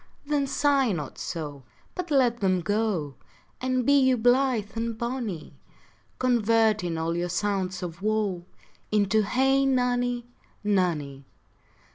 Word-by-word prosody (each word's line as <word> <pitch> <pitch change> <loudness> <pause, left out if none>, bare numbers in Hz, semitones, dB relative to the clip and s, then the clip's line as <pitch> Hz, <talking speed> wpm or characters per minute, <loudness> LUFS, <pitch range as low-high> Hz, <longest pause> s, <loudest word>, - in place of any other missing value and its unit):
Then 285 -1 0
sigh 275 -3 +2
not 150 -5 -5
so, 150 -5 -5 0.3
But 360 -1 -5
let 250 -5 +3
them 185 -2 +1
go, 205 -7 -1 0.5
And 255 -1 0
be 280 - +4
you 260 -1 +3
blith 245 -2 +2
and 230 0 -3
bonny, 235 -8 -4 0.6
Converting 220 -7 +2
all 165 +1 -1
your 175 +1 -2
sounds 190 -1 -1
of 170 0 -6
woe 210 -4 0 0.5
Into 210 0 +3
Hey 265 +6 +2
nonny, 245 -2 +1 0.4
nonny. 160 -9 -1
220 Hz, 120 wpm, -26 LUFS, 180-250 Hz, 0.6 s, be